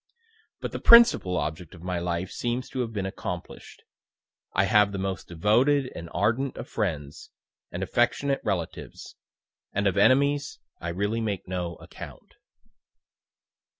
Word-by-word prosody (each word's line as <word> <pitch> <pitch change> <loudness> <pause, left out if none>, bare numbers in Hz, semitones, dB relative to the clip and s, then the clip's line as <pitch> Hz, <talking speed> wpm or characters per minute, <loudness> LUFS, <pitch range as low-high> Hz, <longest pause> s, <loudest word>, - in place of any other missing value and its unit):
But - - -4
the - - -4
principal 235 - +7
object 80 +1 -4
of 85 - -14
my 90 -1 -2
life 85 +1 -2
seems 120 +1 -3
to 130 - -5
have 120 -2 -1
been 100 -3 -3
accomplish'd 95 - -7 0.7
I 95 - +2
have 105 0 +4
the 100 - -4
most 95 0 -3
devoted 125 - +2
and 85 0 -8
ardent 115 +6 0
of - - -6
friends, 75 -10 -3 0.4
and - - -3
affectionate 135 +3 +1
relatives 95 -6 -4 0.6
and 100 +1 -1
of 100 0 +1
enemies 140 +6 +3 0.2
I 85 - -4
really 100 +6 -1
make 105 -4 -3
no 90 -2 -3
account." - - -11
100 Hz, 140 wpm, -26 LUFS, 90-120 Hz, 0.7 s, principal